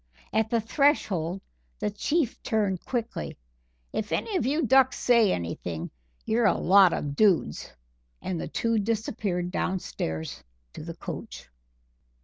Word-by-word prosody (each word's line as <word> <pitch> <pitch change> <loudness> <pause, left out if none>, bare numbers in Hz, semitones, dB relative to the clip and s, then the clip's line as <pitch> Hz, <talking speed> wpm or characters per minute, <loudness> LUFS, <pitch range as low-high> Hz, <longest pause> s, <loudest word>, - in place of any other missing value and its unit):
At 220 0 +2
the 235 - +2
threshold 205 - +1 0.4
the 210 - -2
Chief 285 +5 -1
turned 205 -6 0
quickly: 235 -2 -4 0.6
"If 210 -1 -3
any 435 - -1
of 255 - +1
you 300 +2 +1
ducks 260 +1 +4
say 235 -5 +4
anything, 85 -1 -4 0.3
you're 225 0 +3
a - - +3
lot 190 -1 +6
of 145 -3 -3
dudes," 180 - +2 0.5
and 175 -3 -3
the - - -4
two 230 -1 0
disappeared 205 -4 -2
downstairs 175 - -3 0.3
to - - -8
the - - -7
coach. - - -8
210 Hz, 130 wpm, -27 LUFS, 180-235 Hz, 0.6 s, lot